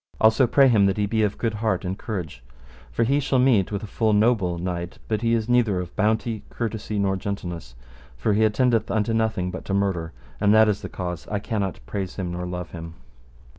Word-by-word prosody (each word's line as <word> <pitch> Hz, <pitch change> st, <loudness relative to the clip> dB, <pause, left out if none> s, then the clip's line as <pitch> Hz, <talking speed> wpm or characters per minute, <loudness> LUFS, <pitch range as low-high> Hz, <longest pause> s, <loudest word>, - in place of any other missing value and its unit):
Also 110 Hz, +3 st, +5 dB
pray 135 Hz, +3 st, +5 dB
him 105 Hz, -5 st, +5 dB
that 95 Hz, -, 0 dB
he 105 Hz, -, +1 dB
be 110 Hz, +2 st, 0 dB
of 105 Hz, -1 st, 0 dB
good 115 Hz, -2 st, -1 dB
heart 105 Hz, -4 st, -1 dB
and 90 Hz, +1 st, -2 dB
courage, 90 Hz, -, -5 dB, 0.5 s
for 115 Hz, -, +1 dB
he 140 Hz, +5 st, +2 dB
shall 135 Hz, -1 st, +1 dB
meet 125 Hz, -7 st, +3 dB
with 100 Hz, +1 st, -3 dB
a -, -, -3 dB
full 110 Hz, +1 st, 0 dB
noble 105 Hz, -5 st, +2 dB
knight, 85 Hz, 0 st, -4 dB
but 110 Hz, -1 st, -1 dB
he 115 Hz, 0 st, +2 dB
is 110 Hz, -1 st, -1 dB
neither 120 Hz, -6 st, +2 dB
of 90 Hz, -1 st, -6 dB
bounty, 110 Hz, +1 st, 0 dB
courtesy, 110 Hz, -2 st, -4 dB
nor 100 Hz, -1 st, +1 dB
gentleness; 90 Hz, -9 st, -5 dB, 0.4 s
for 105 Hz, -, +1 dB
he 110 Hz, +2 st, +3 dB
attendeth 115 Hz, +2 st, +2 dB
unto 105 Hz, +2 st, 0 dB
nothing 110 Hz, -5 st, 0 dB
but 90 Hz, -, -6 dB
to 95 Hz, -, -2 dB
murder, 95 Hz, -5 st, 0 dB, 0.3 s
and 105 Hz, +1 st, +4 dB
that 110 Hz, 0 st, +7 dB
is 105 Hz, -1 st, 0 dB
the -, -, -6 dB
cause 90 Hz, -2 st, -5 dB
I 105 Hz, -, -2 dB
cannot 100 Hz, -, -3 dB
praise 95 Hz, +9 st, -4 dB
him 90 Hz, -3 st, -3 dB
nor 90 Hz, +1 st, -4 dB
love 90 Hz, -1 st, -5 dB
him. 85 Hz, -1 st, -8 dB
105 Hz, 215 wpm, -24 LUFS, 90-110 Hz, 0.5 s, that